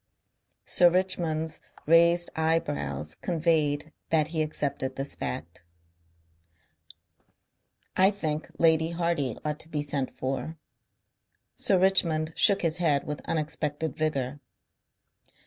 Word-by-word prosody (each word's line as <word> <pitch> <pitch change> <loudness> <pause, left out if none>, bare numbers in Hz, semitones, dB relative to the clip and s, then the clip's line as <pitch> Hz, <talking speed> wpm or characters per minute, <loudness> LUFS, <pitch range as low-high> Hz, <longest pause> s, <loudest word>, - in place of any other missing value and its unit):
Sir 175 - +5
Richmond's 165 -3 0 0.2
raised 170 +2 +4
eyebrows 145 - -1
conveyed 155 - 0 0.2
that 155 -1 +2
he 160 -1 -1
accepted 140 -3 -2
this 135 +1 -3
fact. 85 +2 -6 2.3
"I 190 +1 +5
think 155 -7 -3
Lady 160 -1 +3
Hardy 170 -7 -1
ought 150 0 -2
to 160 - -6
be 150 -2 -2
sent 140 -2 -2
for." 135 +5 -4 1.0
Sir 190 - +2
Richmond 165 -4 +2
shook 200 -3 +5
his 165 -1 +1
head 155 -5 +2
with 150 0 -5
unexpected 155 -1 -2
vigour. 145 -3 -2
155 Hz, 105 wpm, -27 LUFS, 145-170 Hz, 2.3 s, Sir